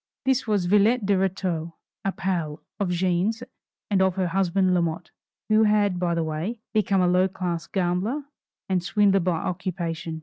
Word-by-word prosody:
This 265 -2 +1
was 205 -4 +1
Villette 210 +4 +3
de 200 - +3
Rétaux, 180 -3 -1 0.3
a 195 - 0
"pal" 170 -6 -3 0.2
of 200 -3 0
Jeanne's 185 +6 0 0.5
and 195 -2 +3
of 190 -1 +2
her 185 -2 0
husband 190 0 +2
Lamotte, 170 -1 -1 0.4
who 215 0 +4
had, 205 -3 +2
by 175 -1 0
the 165 - 0
way, 160 +9 -3 0.2
become 205 -3 +2
a 180 - +3
low 180 +1 +3
class 180 -3 -4
gambler 190 +9 -1 0.4
and 185 -2 0
swindler 200 +1 +3
by 180 -2 0
occupation. 170 -2 -4
185 Hz, 165 wpm, -25 LUFS, 175-200 Hz, 0.5 s, who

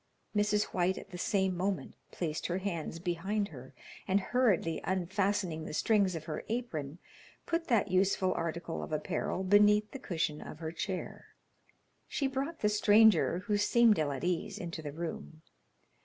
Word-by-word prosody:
Mrs. 210 0 +3
White 185 +1 +1
at 195 - -10
the 180 - -6
same 190 -1 +1
moment 190 +2 -2 0.2
placed 160 -3 -3
her 175 - -1
hands 175 -5 -3
behind 190 +4 -1
her, 130 -3 -12 0.3
and 195 +1 +3
hurriedly 195 -8 +1
unfastening 190 -2 0
the 155 - -5
strings 200 -3 +2
of 160 - -5
her 155 - -4
apron, 165 - -3 0.5
put 335 0 -1
that 215 -6 +2
useful 185 0 +2
article 170 0 -3
of - - -7
apparel 155 +4 -2
beneath 210 +2 +5
the 270 - -7
cushion 160 - -2
of - - -8
her 160 0 -5
chair. 185 +2 -5 0.7
She 280 - -1
brought 275 +5 -2
the 210 - +3
stranger, 210 -4 +5
who 205 0 +1
seemed 225 0 +4
ill 150 -2 +1
at 135 - -5
ease, 180 +3 -1
into 170 -2 -5
the 150 -2 -5
room. 160 0 -6
185 Hz, 160 wpm, -32 LUFS, 165-210 Hz, 0.7 s, beneath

